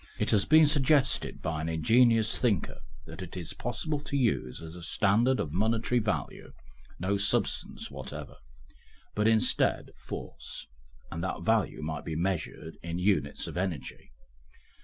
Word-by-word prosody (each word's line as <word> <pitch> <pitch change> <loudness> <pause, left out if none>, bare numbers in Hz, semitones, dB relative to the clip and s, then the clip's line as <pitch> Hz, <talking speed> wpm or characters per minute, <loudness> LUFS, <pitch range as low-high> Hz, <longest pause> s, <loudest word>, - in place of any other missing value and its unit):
It 105 - +1
has 105 -3 +3
been 155 +1 +7
suggested 145 -2 +2
by 75 0 -2
an 80 - -2
ingenious 115 +7 +4
thinker 110 -8 0 0.3
that 80 +2 -9
it 90 0 -7
is 85 -3 -5
possible 145 +6 -3
to 140 0 -3
use 115 - 0
as 80 +1 -8
a 90 - -9
standard 110 +9 +2
of 75 - -2
monetary 110 +6 +1
value 105 -3 -3 0.5
no 95 +3 +1
substance 100 - -1
whatever, - - -7 0.8
but 105 +1 +2
instead, 115 +2 +2
force, - - -7 0.5
and 85 0 -4
that 95 - -3
value 110 -8 +1
might 80 -1 -3
be 80 - -4
measured 85 -2 -3
in 85 0 -4
units 90 -7 +1
of - - -6
energy. 90 -11 -4
100 Hz, 145 wpm, -29 LUFS, 80-115 Hz, 0.8 s, been